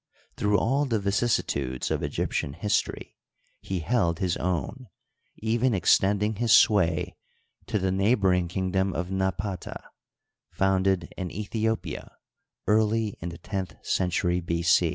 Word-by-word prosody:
Through 105 0 +2
all 135 +7 +1
the 115 -5 0
vicissitudes 100 - 0
of - - 0
Egyptian 70 - -2
history 105 +6 -2 0.5
ne 95 - 0
held 85 -3 +1
his 90 -2 0
own, 90 - -3 0.5
even 115 +2 +1
ex 90 - +5
tending 105 +2 0
his 120 0 +1
sway 90 -8 +4 0.5
to - - 0
the 95 -1 0
neighboring 95 -3 +2
kingdom 95 +1 -1
of 90 +1 -3
Napata, 95 0 -2 0.7
founded 95 -2 +1
in 95 -2 -3
Ethiopia 105 -4 -3 0.5
early 110 0 +2
in 85 - -4
the 85 - -8
tenth 95 +1 -5
century 90 -1 +1
B. 85 0 -2
95 Hz, 125 wpm, -26 LUFS, 90-105 Hz, 0.7 s, ex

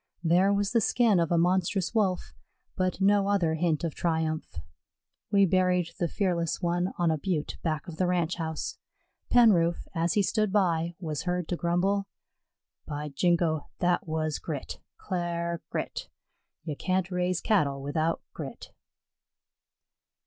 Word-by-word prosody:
There 180 +4 +4
was 200 0 +1
the 230 - +3
skin 220 -4 +3
of 170 -1 0
a 170 - +3
monstrous 180 +2 +1
Wolf, 195 -5 0 0.4
but 185 0 -1
no 200 0 +4
other 185 -6 +2
hint 160 -1 0
of 165 -3 -1
triumph. 160 - -1 0.8
We 200 -1 +5
buried 180 -1 +2
the 175 - +1
fearless 170 -2 -1
one 175 +1 0
on 175 -2 +2
a 155 - -1
butte 160 -2 -2
back 155 -2 -2
of 165 -2 -8
the 185 - +1
Ranch 175 -1 0
house. 160 -2 -4 0.5
Penroof, 185 -9 +4
as 170 0 +1
he 205 - +3
stood 215 0 +1
by, 170 -4 +1
was 155 -5 -3
heard 180 -2 -1
to 175 - 0
grumble: 190 +4 0 0.8
"By 150 0 -4
jingo, 165 0 +1
that 180 -1 +1
was 155 -1 -1
grit 150 -5 -5 0.2
cl'ar 170 -2 -3
grit! - - -4 0.5
Ye 155 -1 -3
can't 185 +4 -1
raise 180 0 0
Cattle 145 -10 +1
without 155 +4 -1
grit." - - -8
175 Hz, 145 wpm, -28 LUFS, 160-190 Hz, 0.8 s, We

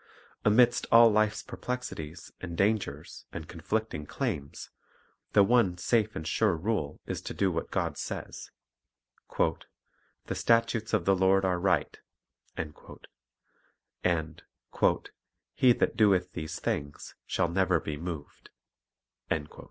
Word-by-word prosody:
Amidst 120 +3 +4
all 115 0 +8
life's 105 0 +1
perplexities 85 -10 -6
and 85 -2 -6
dangers 100 -8 -1
and 80 -2 -7
conflicting 85 -2 -3
claims, 70 0 -4 0.6
the 100 - +7
one 100 -5 +3
safe 110 +3 +1
and 80 - -5
sure 105 -6 +2
rule 85 -5 -2
is - - -4
to - - -6
do 95 -2 +2
what 85 -1 -3
God - - -2
says. - - -6 0.9
"The - - -4
statutes 115 -1 +1
of - - -1
the 95 - +4
Lord 95 +1 +3
are 90 -1 +1
right," 90 -5 +1 0.6
and 75 -2 -4 2.8
"he 130 - +5
that - - 0
doeth 95 -5 +3
these 80 -2 -5
things 70 0 -4
shall 85 - +1
never 95 +1 +2
be 75 - -4
moved. 80 -2 -7 0.4
" - - -53
s - - +2
Hsa. 75 - -16
95 Hz, 125 wpm, -29 LUFS, 80-110 Hz, 2.8 s, all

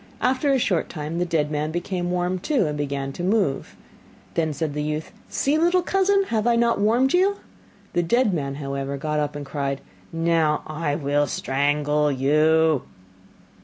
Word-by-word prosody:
After 265 +3 +1
a 270 - +4
short 190 -9 0
time 155 +1 -4
the 180 - +1
dead 155 -3 0
man 150 0 -1
became 175 +2 -3
warm 180 +1 -1
too, 255 - +1
and 150 -1 -2
began 140 -2 -3
to 175 - -6
move. 190 -8 0 0.6
Then 160 -2 0
said 150 0 -3
the 150 - -2
youth, 150 +1 -3 0.2
'See, 290 +3 +1
little 350 +2 +3
cousin, 390 +2 +2
have 220 0 0
I 240 - +4
not 235 -1 +2
warmed 235 +6 +3
you?' 385 +3 +3 0.6
The 175 - +2
dead 215 +5 +2
man, 140 -4 -2
however, 140 -1 -4
got 150 +2 -2
up 150 -1 -2
and 145 -1 -5
cried: 140 -1 -3 0.3
'Now 165 -2 +1 0.4
will 145 0 +1
I - - +3
strangle 145 +2 +1
you. 155 +2 +3
160 Hz, 170 wpm, -23 LUFS, 145-215 Hz, 0.6 s, a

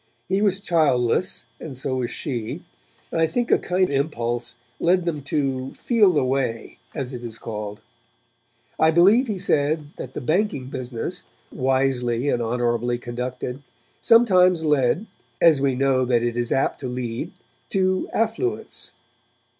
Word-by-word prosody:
He 190 +2 +1
was 200 -2 +2
childless 155 - +1
and 140 -6 -7
so 130 0 -1
was 120 -2 -1
she, 120 -6 -4 0.5
and 165 - 0
I 160 - +4
think 240 +8 -1
a - - +5
kind 185 +1 +1
impulse 120 -4 -1 0.2
led 180 0 +2
them 155 -4 -2
to 135 -3 -2
'feel 215 -6 +3
the 145 -4 +2
way', 130 -3 -2 0.2
as 135 -3 -4
it 120 -1 -7
is 115 -2 -6
called. 105 -2 -6 1.0
I 160 - +5
believe 195 +10 +5
he 210 -3 -2
said 150 -2 +1
that 130 - -7
the - - -4
banking 155 - 0
business, 130 +7 -5 0.3
wisely 130 -1 0
and 120 - +1
honourably 120 +1 0
conducted, 125 +2 -5 0.4
sometimes 185 -7 +5
led, 150 - +2 0.3
as 160 -5 +5
we 135 -2 +2
know 130 0 +2
that 120 -2 +2
it 120 -1 -1
is 120 -1 -2
apt 135 - +1
to 130 - -4
lead, 120 -2 -4 0.4
to 185 -1 +1
affluence. 230 - -2
135 Hz, 145 wpm, -23 LUFS, 120-175 Hz, 1.0 s, a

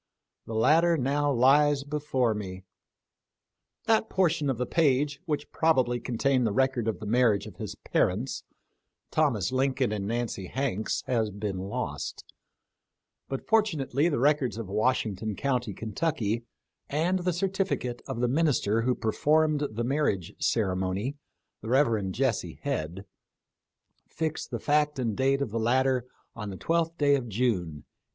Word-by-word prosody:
The 110 - -5
latter 165 +9 +4
now 145 +2 +1
lies 140 +3 +4
before 140 -5 0
me. 95 -3 -6 1.2
That 220 0 +2
portion 170 -6 +1
of 130 - 0
the 125 - -1
page 145 -1 +1
which 150 -4 -3
probably 130 -7 +2
contained 125 +1 +1
the - - 0
record 130 0 +1
of 110 - -1
the 110 - -7
marriage 115 -2 +3
of - - -11
his - - -6
parents, 110 +9 -1 0.7
Thomas 125 - +1
Lincoln 130 -2 +1
and 100 -2 -2
Nancy 115 -4 -3
Hanks, 120 -4 -2
has 115 -4 0
been 100 -1 -4
lost; 95 +2 -4 1.0
but 135 - -4
fortunately 165 - +2
the 150 - 0
records 140 -2 +2
of 115 -4 -5
Washington 110 -1 0
county, 125 -4 -1
Kentucky, 115 - -2 0.4
and 170 +6 +1
the 180 0 -1
certifi 190 +2 0
cate 120 -1 -5
of 130 -3 -3
the 125 - +3
minister 125 -6 +2
who 125 +2 +1
performed 150 +6 +2
the 115 +2 -3
marriage 120 - 0
ceremony 95 +4 0 0.2
— - - -55
the 110 - -6
Rev. 115 -7 +2
Jesse 125 +4 -1
Head 95 - -3 0.5
— - - -48
fix 160 -1 -2
the - - -4
fact 150 0 +1
and 115 -5 -1
date 135 +3 +2
of 115 - -5
the 115 - -1
latter 125 +2 +2 0.3
on 105 -3 -5
the 95 - -6
12th 165 - 0
day 145 -1 +4
of 130 -4 0
June, 95 -10 -1
1806. - - -52
130 Hz, 150 wpm, -28 LUFS, 110-145 Hz, 1.2 s, latter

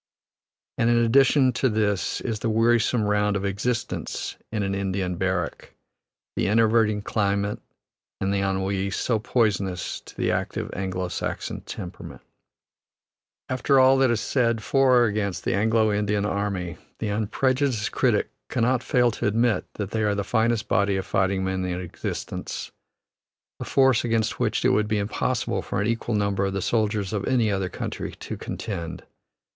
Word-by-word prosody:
And 115 - +3
in 120 - +4
addition 130 +3 +4
to 130 - +1
this 105 -3 0
is 110 -4 -3
the 115 - -1
wearisome 115 +1 +3
round 105 0 +1
of 100 0 -1
existence 110 +5 -2 0.2
in 105 -2 -1
an 95 0 -1
Indian 95 -2 -1
barrack, 90 -2 -2 0.6
the - - 0
enervating 110 -1 +3
climate 100 -1 0 0.6
and 95 0 0
the 100 - +1
ennui, 95 0 0
so 110 +4 0
poisonous 100 -6 0
to - - -15
the - - +1
active - - -2
Anglo 95 -1 -2
Saxon - - -4
temperament. 90 - -8 1.2
After 130 +1 +2
all 130 +1 +6
that 135 -2 +4
is 115 -2 +1
said 115 -4 +1
for 135 0 +4
or 120 - +5
against 100 -4 -1
the - - +1
Anglo 110 +1 +2
Indian 105 0 0
army, 100 -4 -2 0.2
the 110 - -3
unprejudiced 115 +3 0
critic - - +1 0.2
cannot 125 +1 +1
fail 125 -3 +2
to 110 - -2
admit 115 +2 +2
that 105 -2 -4
they 110 - -1
are 105 -1 +1
the 100 - -1
finest 110 +1 +1
body 100 +1 +2
of 95 - -3
fighting 95 0 +1
men 95 0 -1
in 90 -1 -2
existence, 90 -2 -5 0.9
a - - -4
force 130 -3 +3
against 115 -2 0
which 110 -1 0
it - - +6
would 105 -4 +2
be 110 0 0
impossible 105 0 -1
for 95 - -3
an 100 - +1
equal 115 0 -1
number 100 -1 +1
of 95 0 -1
the 100 - -2
soldiers 105 -3 0
of 100 -2 -1
any 120 -5 +2
other 95 -2 -1
country - - -5
to - - -7
contend. 85 -6 -5
105 Hz, 160 wpm, -25 LUFS, 100-115 Hz, 1.2 s, all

